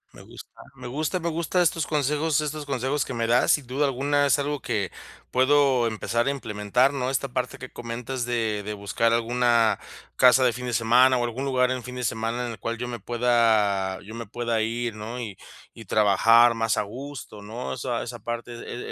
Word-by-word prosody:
Me - - -12
gusta, - - -13
me - - -9
gusta, 155 +7 -2
me 170 0 -2
gusta 170 +2 0
estos 165 -2 0
consejos, 150 +1 +1
estos 150 -1 -4
consejos 135 +1 -1
que 130 - -6
me 115 -1 0
das, 120 +2 +3
sin 145 - 0
duda 135 +4 0
alguna, 140 +2 +1
es 140 - +4
algo 145 0 -2
que 105 -5 -2 0.4
puedo 130 -2 +3
empezar 115 +2 -1
a - - +3
implementar, 125 0 0
¿no?, 130 -2 -1
esta 135 +1 -1
parte 125 0 -3
que 130 -1 -9
comentas 120 +2 -5
de 115 -3 -1
de 105 +1 -5
buscar 105 +3 0
alguna 115 -1 +2 0.4
casa 125 +1 +6
de 120 - +3
fin 125 +1 -6
de 120 - -3
semana 125 +3 +4
o 120 - 0
algún 120 +3 -3
lugar 130 -2 +2
en 130 -1 -2
fin 125 +1 -8
de 125 - -4
semana 115 +2 -2
en 120 - -4
el 110 - -9
cual 115 +4 -3
yo 125 +2 -4
me 120 -1 -5
pueda, 110 -4 +2
yo 105 +3 -10
me 115 -1 -7
pueda 115 0 -1
ir, 115 +1 -2
¿no?, 110 +3 -7
y 110 -5 -6 0.4
y 115 - -11
trabajar 110 +4 +5
más 115 0 0
a - - +1
gusto, 120 -1 -9
¿no?, 110 +5 -6
esa 120 -1 -3
esa 120 0 -7
parte, 120 +2 -5
e 120 +1 -7
120 Hz, 210 wpm, -25 LUFS, 115-130 Hz, 0.4 s, casa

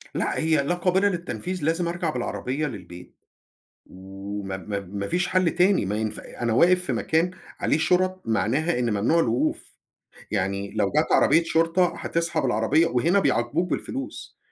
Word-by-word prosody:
لأ - - -1
هي 155 -3 +2
لا 175 +6 0
قابلة 185 +3 +2
للتنفيذ، 175 - -4
لازم 165 +3 +1
أرجع 170 -1 -2
بالعربية 135 +2 -3
للبيت. 90 -7 -10 0.7
وما 95 +1 -7
ما 100 +1 -4
ما 100 +1 -5
فيش 175 - 0
حل 185 -2 +2
تاني 185 - +2
ما 105 +2 -2
ينفع 110 0 -3 0.2
أنا 115 -1 +1
واقف 180 +9 +4
في - - -1
مكان 165 +3 +1 0.3
عليه - - +1
شُرَط 185 +3 +1
معناها 125 +8 0
إن 120 -1 0
ممنوع 110 +11 +2
الوقوف، 120 -5 -1 0.6
يعني 100 0 -2
لو 105 -2 +1
جات 155 - +2
عربية 165 +4 +5
شرطة 165 +2 +2
هتسحب 165 -3 -1
العربية 130 +8 +2
وهنا 170 +9 +2
بيعاقبوك 150 +5 0
بالفلوس، 270 +2 -5
155 Hz, 155 wpm, -24 LUFS, 105-175 Hz, 0.7 s, عربية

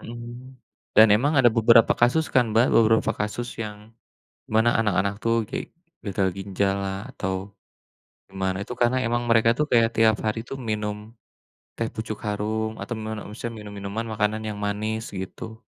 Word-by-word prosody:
Mhm, 120 +2 -9 0.4
dan 110 - +9
emang 135 +9 +3
ada 120 -2 +6
beberapa 115 0 +5
kasus 125 +7 +4
kan 125 -2 +5
Mbak, 115 +3 +5
beberapa 110 -1 +4
kasus 120 +3 -2
yang 105 0 -9 0.7
mana 110 +2 +5
anak-anak 100 -2 +1
tuh 115 0 +2 0.2
kayak - - -4 0.4
gagal 100 -1 0
ginjallah, 95 0 -1
atau 95 -6 -3 0.9
gimana. 95 -1 -2
Itu 125 - -7
karena 120 +2 +3
emang 120 +1 0
mereka 115 0 +5
tuh 150 - +2
kayak 115 -1 +5
tiap 110 -1 +4
hari 110 +1 0
tuh 135 - -5
minum 105 -1 -1 0.8
Teh 115 - 0
Pucuk 110 -1 -5
Harum 110 +1 -1
atau 120 - -4
mana 110 0 -5
maksudnya 115 +2 -6
minum-minuman 100 +2 -5
makanan 110 +1 0
yang 105 -1 -5
manis 110 +2 -2 0.2
gitu. 110 +4 -8
110 Hz, 155 wpm, -24 LUFS, 105-115 Hz, 0.9 s, dan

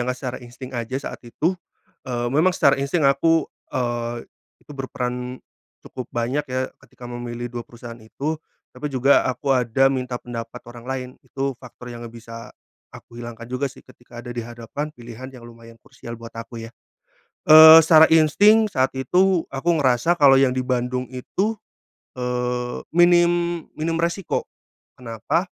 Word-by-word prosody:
nggak 125 0 -2
secara 130 -1 -5
insting 125 +2 -11
aja 120 +1 -3
saat - - -10
itu, 155 +9 0 0.6
eee, 120 -1 -2
memang 160 +6 +3
secara 140 -5 +3
insting 140 +3 0
aku, 150 +3 +3 0.2
eee, 120 -1 -3 0.4
itu - - -12
berperan 125 -2 -4 0.5
cukup 130 - -8
banyak 125 +5 -2
ya 130 +1 -3
ketika 125 - -15
memilih 120 0 -6
2 120 -1 -5
perusahaan 120 0 -11
itu. 145 +8 -4 0.3
Tapi 150 - -5
juga 135 +1 +4
aku 130 +2 0
ada 125 +1 +2
minta 125 -2 -3
pendapat 115 -2 -7
orang 120 0 -11
lain, 130 -1 -3
itu 135 0 -3
faktor 125 -1 -11
yang 120 0 -9
nggak 115 - -13
bisa 115 0 -10 0.4
aku 120 - -13
hilangkan 120 0 -8
juga 130 +2 -1
sih 135 - -16
ketika 120 -1 -13
ada 120 - -8
di 120 - -7
hadapan 120 +6 -6
pilihan 120 +1 -10
yang 125 -2 -13
lumayan 115 -1 -14
krusial 115 - -10
buat 115 0 -11
aku 115 0 -8
ya. 115 - -10 0.8
Eee, 160 +1 +11
secara 160 0 +7
insting 205 +8 +5
saat 130 -8 0
itu 180 +7 +2
aku 135 +6 -1
ngerasa 130 +4 +3
kalau 140 -2 +7
yang 135 -1 +3
di 130 - 0
Bandung 125 0 -2
itu, 190 - -2 0.6
eee, 125 -1 -2 0.2
minim 175 -1 +3
minim 165 +1 -2
resiko. 170 +2 -1 0.5
Kenapa, 120 - -2
125 Hz, 155 wpm, -22 LUFS, 120-150 Hz, 0.8 s, Eee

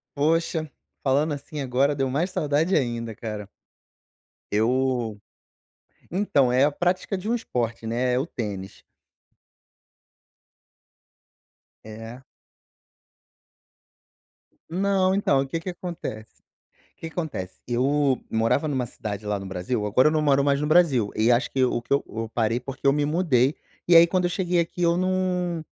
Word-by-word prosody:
Poxa, 160 +1 +1 0.3
falando 145 +3 +2
assim 145 +2 -7
agora, 135 +2 +1
deu 135 -1 0
mais 155 +8 0
saudade 155 +3 +1
ainda, 115 -4 -1
cara. 105 -2 -6 1.0
Eu 120 0 +1 0.9
então, 155 -9 +2
é 130 +2 +4
a 145 - +4
prática 180 +5 -1
de 185 +3 -7
um - - +2
esporte, 120 - -3
né, 125 +2 0
é 125 - +2
o 135 - -1
tênis. 100 - -6 3.0
É. 115 +3 -9 2.5
Não, 190 +1 +2
então, 140 -9 +2
que 165 +5 -3
que 175 - -6
acontece 170 -12 -7 0.6
que 165 - -8
que - - -15
acontece, 140 - -5
eu 135 +2 +1
morava 115 +7 +1
numa 135 -4 -1
cidade 105 -2 -6
lá 105 -1 -1
no 95 - -8
Brasil, 95 +4 -2
agora 125 +8 +4
eu - - 0
não 155 - +2
moro 140 -2 +3
mais 140 0 +2
no 150 - -1
Brasil, 150 -10 +3
e 110 +2 +2
acho 120 +2 +3
que 135 - +1
o 125 - 0
que 120 - -6
eu 140 - +2
eu 115 0 -5
parei, 115 0 +1
porque 135 +3 -9
eu - - +6
me 145 +1 +1
mudei, 145 -4 +2 0.3
e 175 - +5
aí 165 0 +10
quando 180 +1 0
eu 175 - +1
cheguei 180 -1 0
aqui 170 +1 -1
eu 170 0 +3
não 180 -2 0
140 Hz, 150 wpm, -25 LUFS, 120-165 Hz, 3.0 s, aí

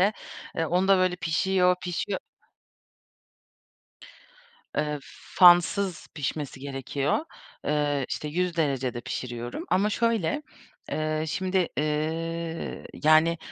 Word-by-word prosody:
İşte, 200 +3 +4 0.4
eee, 165 - +1
onda 185 +3 +3
böyle 185 -1 +2
pişiyor, 180 +1 +2
pişiyor 180 +2 -2 2.6
Eee, 150 0 0 0.4
fansız 175 0 +5
pişmesi 145 -1 -3
gerekiyor. 140 - -1 0.5
Eee, 145 -2 +1
işte, 150 - -3
100 175 +2 -1
derecede 135 -6 0
pişiriyorum 120 0 -5
ama 195 +3 +3
şöyle, 225 - +1 0.5
eee, 155 0 -1
şimdi, 185 +1 0
eee, 160 +2 -2 0.2
yani, 155 +2 +5
165 Hz, 95 wpm, -27 LUFS, 150-180 Hz, 2.6 s, fansız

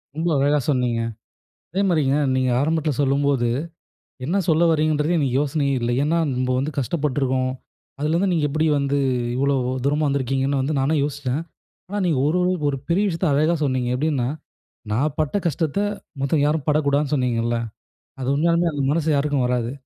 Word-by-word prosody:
ரொம்ப 165 +2 -1
அழகா 145 +2 +3
சொன்னீங்க. 125 -4 +1 0.7
அதேமாதிரிங்க, 170 -7 +2 0.2
நீங்க 130 -1 +1
ஆரம்பத்துல 155 0 0
சொல்லும்போது 140 -2 +1 0.8
என்ன 170 +9 0
சொல்ல 160 +1 +4
வரீங்கன்றதே 155 +1 +1
எனக்கு 135 -4 0
யோசனையே 145 -1 0
இல்ல. 120 0 -1
ஏன்னா, 160 +3 +1 0.2
நம்ப 130 0 -1
வந்து 140 +4 -1
கஷ்டப்பட்டுருக்கோம். 130 -2 0 0.5
அதுலேருந்து 165 +6 +1
நீங்க 160 -3 +1
எப்படி 155 +3 0
வந்து 140 0 0 0.4
இவ்வளவு 135 -2 +1
தூரமா 145 +2 +1
வந்திருக்கீங்கன்னு 135 0 0
வந்து 140 +4 -1
நானும் 145 +3 +1
யோசிச்சேன். 140 -1 -2 0.5
ஆனா, 205 +2 -3
நீங்க 160 -6 +1
ஒரு 160 - +1
ஒரு 180 +1 +2 0.2
ஒரு 140 - -1
பெரிய 180 +4 +2
விஷயத்த 175 0 -1
அழகா 155 +4 +3
சொன்னீங்க. 130 -3 0
எப்படின்னா, 140 -3 0 0.6
நான் 140 +6 0
பட்ட 155 +4 0
கஷ்டத்த 160 +1 -1 0.4
மத்தவங்க 140 +2 +1
யாரும் 150 -1 -1
படக்கூடாதுன்னு 145 -1 +1
சொன்னீங்கல்ல. 120 -3 0 0.7
அது 130 - -3
உண்மையாலுமே 170 +3 +2
அந்த 145 -2 -2
மனசு 160 0 0
யாருக்கும் 140 -2 +1
வராது. 125 -1 -1
145 Hz, 150 wpm, -22 LUFS, 135-155 Hz, 0.8 s, சொல்ல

